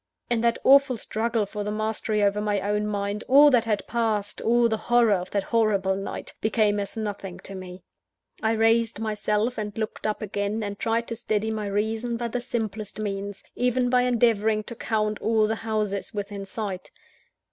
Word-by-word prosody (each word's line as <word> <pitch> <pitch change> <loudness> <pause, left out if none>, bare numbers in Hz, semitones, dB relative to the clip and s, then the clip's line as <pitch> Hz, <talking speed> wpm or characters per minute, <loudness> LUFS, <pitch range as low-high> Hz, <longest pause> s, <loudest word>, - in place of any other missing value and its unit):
In 235 -2 +2
that 235 0 +2
awful 275 -2 +6
struggle 225 0 -1
for 205 +1 -5
the 205 - -3
mastery 215 0 -1
over 205 +1 +2
my 210 -1 0
own 210 +2 -1
mind, 205 0 -2
all 290 +2 +7
that 240 -3 +3
had 210 -3 -1
passed, 220 -3 -1
all 235 +1 +4
the 220 - 0
horror 240 -3 +5
of 185 -1 -2
that 200 -1 -1
horrible 200 -4 +1
night, 195 +1 -6
became 215 -2 +2
as 200 +3 -5
nothing 205 -4 -4
to 195 - -9
me. 185 -1 -9 0.6
I 220 0 +2
raised 225 0 +2
myself, 215 +2 -1
and 210 -1 -5
looked 220 -1 -3
up 215 0 -2
again, 205 +1 -2
and 205 -1 -5
tried 230 +1 0
to 230 - -3
steady 220 -1 -1
my 215 -2 -3
reason 220 +4 -1
by 235 0 -3
the 245 +2 -2
simplest 220 -4 -4
means 200 -1 -4
even 250 0 +1
by 250 -1 +5
endeavouring 225 -3 +2
to 235 - -8
count 215 -1 -1
all 220 -1 +3
the 220 +1 -1
houses 215 -2 -2
within 200 -1 -4
sight. 195 -2 -5
215 Hz, 185 wpm, -25 LUFS, 205-230 Hz, 0.6 s, all